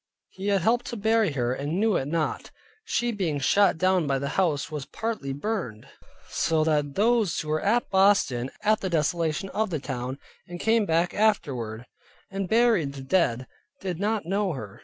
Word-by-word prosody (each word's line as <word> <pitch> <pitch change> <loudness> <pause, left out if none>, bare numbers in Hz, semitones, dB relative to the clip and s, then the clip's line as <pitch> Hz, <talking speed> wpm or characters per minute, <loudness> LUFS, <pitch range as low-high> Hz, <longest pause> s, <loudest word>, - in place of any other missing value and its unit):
he 190 +2 -7
had 200 -2 +2
helped 240 +6 +1
to 240 - -4
bury 220 -4 +2
her, 125 -2 0
and 145 +7 -2
knew 220 -2 +2
it 135 - -1
not. 155 0 -2 0.4
She 240 - 0
being 180 -9 -1
shot 200 +7 +3
down 185 -2 +2
by 135 -1 +1
the 140 +1 -3
house 160 -6 0
was 150 -3 -5
partly 220 -12 -4
burnt, 145 - -4 0.4
so 160 -1 +1
that 150 -3 0
those 220 -3 +2
who 155 - -5
were 155 0 0
at 235 +4 +1
Boston 190 -11 +3
at 215 0 +2
the 190 - -2
desolation 165 +2 0
of 215 +1 -1
the 165 - -1
town, 130 0 -4 0.3
and 175 0 -8
came 225 0 +2
back 165 +2 +1
afterward, 125 - 0 0.5
and 195 -2 -3
buried 220 -11 +3
the 135 -1 -8
dead, 130 -6 +1 0.3
did 180 -3 -4
not 210 -1 -1
know 195 0 0
her. 105 -8 -8
175 Hz, 180 wpm, -26 LUFS, 140-210 Hz, 0.5 s, shot